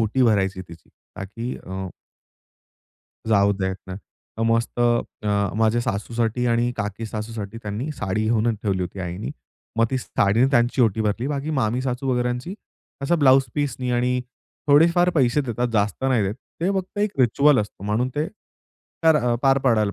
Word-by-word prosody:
ओटी 115 +4 +1
भरायची 95 -5 +2
तिची 85 -3 -14 0.3
ताकी 115 +6 -5
अ 95 0 -5 1.4
जाऊ 100 -1 +4
देत 95 -1 -2
नाही. 95 +1 -6 0.4
तर - - 0
मस्त 115 +1 -1
अ, 105 -4 0
माझ्या 110 +1 +2
सासूसाठी 115 +2 -1
आणि 120 +1 +2
काकी-सासूसाठी 110 +1 -5
त्यांनी 110 +8 -4
साडी 105 -4 -2
घेऊनच 115 0 +2
ठेवली 95 -3 0
होती 90 +2 -6
आईनी, 90 +7 -4 0.5
मग 115 - +5
ती 130 - 0
साडीने 115 +2 +2
त्यांची 120 0 +3
ओटी 110 -1 +2
भरली. 110 +4 -1
बाकी 145 +1 -2
मामी-सासू 130 0 -1
वगेरची 125 +8 -2 0.5
असं 170 +4 +1
ब्लाउज 135 -1 +6
पीसनी 135 -4 -2
आणि 125 +1 +1 0.5
थोडेफार 170 +5 +5
पैसे 135 -1 +3
देतात 120 -2 -2
जास्त 105 +3 0
नाही 125 -5 +2
देत. 100 +2 -1 0.3
ते 180 +3 +1
फक्त 190 +2 -7
एक 205 -8 -1
रिच्युअल 140 +4 +4
असतो 105 -1 -7
म्हणून 110 +5 0
ते, 150 +2 0 0.8
तर 160 -1 +6
अ, 120 -3 +1
पार 135 0 +4
पाडायला 110 -6 +2
120 Hz, 155 wpm, -23 LUFS, 105-130 Hz, 1.4 s, ब्लाउज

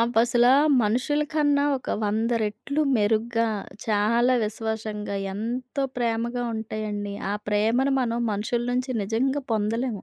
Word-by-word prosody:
అవసల 240 +1 +3 0.4
మనుషుల 255 +8 +1
కన్నా 290 -2 +2
ఒక 255 - -6
వంద 220 +3 0
రెట్లు 235 +8 -2
మెరుగ్గా, 225 +2 +1 0.4
చాలా 230 +4 +3
విశ్వాసంగా, 215 -1 -4 0.2
ఎంతో 245 +6 -3
ప్రేమగా 235 0 -1
ఉంటాయండి. 215 -2 -4 0.2
ఆ - - 0 0.2
ప్రేమను 225 +6 +2
మనం 235 -2 -1
మనుషుల 220 +4 -1
నుంచి 250 +1 -1
నిజంగా 260 +7 0
పొందలేము. 220 0 -1
230 Hz, 115 wpm, -25 LUFS, 215-250 Hz, 0.4 s, అవసల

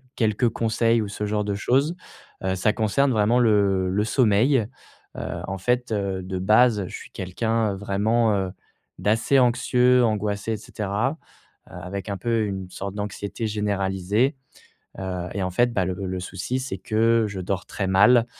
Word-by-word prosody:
quelques 110 +1 +1
conseils 115 0 +1
ou 105 - -4
ce 105 +1 -4
genre 105 0 0
de 100 0 -2
chose. 135 - +1 0.5
Heu, 95 0 0
ça 95 +4 +2
concerne 125 +5 +1
vraiment 110 +1 +3
le 100 -5 +3
le 100 +3 +1
sommeil. 115 +1 +3 0.5
Heu, - - -4 0.3
en 95 - -3
fait, 125 +6 0
heu, 100 -3 -1
de 95 0 -4
base 105 +1 +4
je - - -8
suis - - -10
quelqu'un 110 +3 -1
vraiment, 105 +3 +1
heu, 95 -2 -1 0.5
d'assez 115 +6 +2
anxieux, 125 0 +3
angoissé 105 -1 -1
et - - -2
cetera. 105 +7 -2 0.5
Heu, - - -16
avec 90 +3 -6
un 100 - -2
peu, 115 +2 0
une 95 -2 -5
sorte 100 +1 -6
d'anxiété 105 +2 -4
généralisée. 105 - 0 0.6
Heu 90 -2 -4
et 100 - -3
en 95 - -1
fait, 120 +6 +2
bah, 95 -5 +1
le 95 - -2
le 95 0 -3
souci 95 +7 -3
c'est 130 -6 -4
que 115 +4 +2
je 100 -2 -6
dors 95 +1 -3
très 100 - -3
mal, 115 +6 +5
105 Hz, 170 wpm, -24 LUFS, 95-115 Hz, 0.6 s, mal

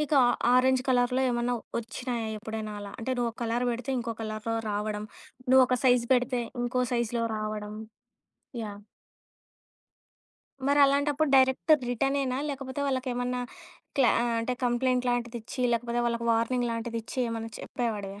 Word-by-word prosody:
నీకు 300 0 0
ఆ - - +5 0.3
ఆరెంజ్ 260 0 +4
కలర్‌లో 250 0 +3
ఏమన్నా 240 0 0 0.2
వచ్చినాయా 235 0 -4
ఎప్పుడైనా 220 0 -5
అలా? 200 -1 -8
అంటే, 255 +3 -2
నువ్వో 235 -1 0
కలర్ 235 +1 0
పెడితే 245 +3 -3
ఇంకో 230 -1 -3
కలర్‌లో 215 +1 -3 0.2
రావడం, 210 0 -2 0.5
నువ్వొక 255 -1 +6
సైజ్ 245 -2 +4
పెడితే 250 0 +1 0.2
ఇంకో 250 +1 0
సైజ్‌లో 235 -1 0
రావడం. 215 -1 -4 0.9
యాహ్! 205 -1 -8 1.9
మరలాంటప్పుడు 285 +1 +4
డైరెక్ట్ 265 +4 +4
అది 280 -4 -3
రిటర్న్ 270 +3 +1
ఏనా 255 -1 -1
లేకపోతే 270 0 -5
వాళ్ళకి 260 -1 -1
ఏమన్నా 250 0 -1 0.6
క్లా 260 -3 +6
ఆహ్, 235 -1 0
అంటే 250 +2 -1
కంప్లెయింట్ 250 +1 +1
లాంటిది 240 -1 -2
ఇచ్చి 250 +3 -5
లేకపోతే 235 +1 0
వాళ్ళకి 235 0 -1
వార్నింగ్ 240 +2 +1
లాంటిది 230 0 -3
ఇచ్చి 230 - -8
ఏమన్నా 225 0 -4
చెప్పేవాడివా? 205 -5 -4
240 Hz, 140 wpm, -28 LUFS, 230-255 Hz, 1.9 s, నువ్వొక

